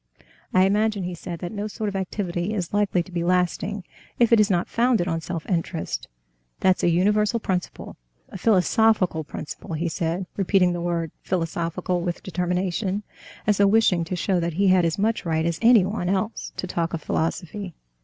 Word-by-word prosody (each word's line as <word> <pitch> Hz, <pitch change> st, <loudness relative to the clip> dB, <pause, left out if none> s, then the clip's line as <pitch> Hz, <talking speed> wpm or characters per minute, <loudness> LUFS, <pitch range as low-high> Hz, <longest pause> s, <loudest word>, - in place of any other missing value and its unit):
"I 185 Hz, 0 st, +5 dB
imagine," 210 Hz, 0 st, +1 dB
he 180 Hz, 0 st, -3 dB
said, 170 Hz, -1 st, -7 dB
"that 175 Hz, -, -4 dB
no 210 Hz, 0 st, -3 dB
sort 215 Hz, 0 st, -4 dB
of 200 Hz, -, -3 dB
activity 190 Hz, 0 st, -2 dB
is 180 Hz, -3 st, -3 dB
likely 205 Hz, -4 st, +2 dB
to 185 Hz, -, -15 dB
be 170 Hz, -1 st, -2 dB
lasting 180 Hz, +3 st, 0 dB, 0.3 s
if 235 Hz, -1 st, +4 dB
it 230 Hz, -, +7 dB
is 210 Hz, 0 st, +4 dB
not 175 Hz, -3 st, +1 dB
founded 230 Hz, -6 st, +2 dB
on 165 Hz, -2 st, -1 dB
self 165 Hz, 0 st, -5 dB
interest, 170 Hz, -2 st, -2 dB, 0.5 s
that's 185 Hz, -1 st, +3 dB
a -, -, +3 dB
universal 210 Hz, +6 st, +2 dB
principle, 185 Hz, -4 st, -4 dB, 0.3 s
a 195 Hz, -, -8 dB
philosophical 205 Hz, -4 st, +3 dB
principle," 155 Hz, +2 st, -7 dB
he 170 Hz, +3 st, -1 dB
said, 170 Hz, +3 st, -2 dB
repeating 190 Hz, -2 st, +3 dB
the 175 Hz, -, -3 dB
word 170 Hz, -2 st, -1 dB
"philosophical" 175 Hz, 0 st, -2 dB
with 175 Hz, 0 st, -3 dB
determination, 185 Hz, +2 st, -1 dB, 0.4 s
as 210 Hz, -2 st, +3 dB
though 200 Hz, -, +5 dB
wishing 195 Hz, -5 st, +3 dB
to 180 Hz, -, -3 dB
show 180 Hz, +1 st, 0 dB
that 170 Hz, -1 st, -1 dB
he 195 Hz, +3 st, +3 dB
had 185 Hz, -2 st, +5 dB
as 165 Hz, -1 st, 0 dB
much 215 Hz, +3 st, 0 dB
right 160 Hz, -2 st, 0 dB
as 170 Hz, -1 st, -1 dB
anyone 215 Hz, -5 st, +4 dB
else 195 Hz, +3 st, -2 dB
to -, -, -2 dB
talk 170 Hz, -2 st, -2 dB
of 160 Hz, -, -7 dB
philosophy. 175 Hz, +3 st, -3 dB
185 Hz, 185 wpm, -24 LUFS, 170-205 Hz, 0.5 s, it